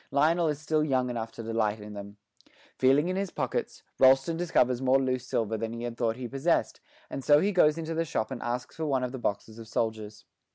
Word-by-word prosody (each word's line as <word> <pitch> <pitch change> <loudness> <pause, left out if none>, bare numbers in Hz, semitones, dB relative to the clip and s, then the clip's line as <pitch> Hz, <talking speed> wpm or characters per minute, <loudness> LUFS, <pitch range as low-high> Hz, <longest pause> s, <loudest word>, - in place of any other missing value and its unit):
Lionel 160 +4 +3
is 150 -2 0
still 155 +1 0
young 130 -4 +1
enough 115 -2 -4
to 115 - -8
delight 110 -1 -1
in 105 0 -9
them. 100 0 -9 0.6
Feeling 135 +5 +3
in 185 - -1
his 195 0 -1
pockets, - - -3 0.2
Rolleston 135 +4 +5
discovers 130 -7 +1
more 130 0 +4
loose 130 -1 -1
silver 110 -1 -1
than 115 +1 -3
he 115 0 -6
had 120 -1 -4
thought 115 -1 0
he 125 0 -5
possessed, 140 +7 0 0.3
and 135 - -5
so 145 +2 +6
he 200 +6 +1
goes 160 -5 +4
into 165 0 -4
the 165 +1 0
shop 110 -8 -2
and 130 - -5
asks 120 +1 -4
for 160 - -3
one 135 -3 +1
of 125 - -2
the 130 - -6
boxes 110 +1 -3
of 115 - -10
soldiers. 110 -2 -3
130 Hz, 230 wpm, -28 LUFS, 115-150 Hz, 0.6 s, so